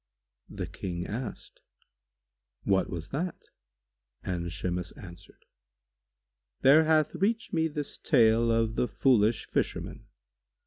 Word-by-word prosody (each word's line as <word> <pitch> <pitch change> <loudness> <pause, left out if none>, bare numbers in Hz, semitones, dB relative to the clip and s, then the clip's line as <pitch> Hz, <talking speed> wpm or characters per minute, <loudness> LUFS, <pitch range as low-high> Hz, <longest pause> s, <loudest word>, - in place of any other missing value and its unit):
The - - -5
King 90 -1 -5
asked, 115 +3 -7 1.0
"What 95 -1 +1
was 85 -2 -6
that?"; 170 - -3 0.8
and 85 -2 -3
Shimas 90 +1 -3
answered, 85 -2 -14 1.2
"There 150 +4 +6
hath 155 -1 +3
reached 210 +6 -1
me 160 -1 +2
this 150 -2 -5
tale 115 -4 +4
of 115 -1 +1
The 125 - 0
Foolish 110 0 +2
Fisherman. - - -3
115 Hz, 105 wpm, -28 LUFS, 95-150 Hz, 1.2 s, There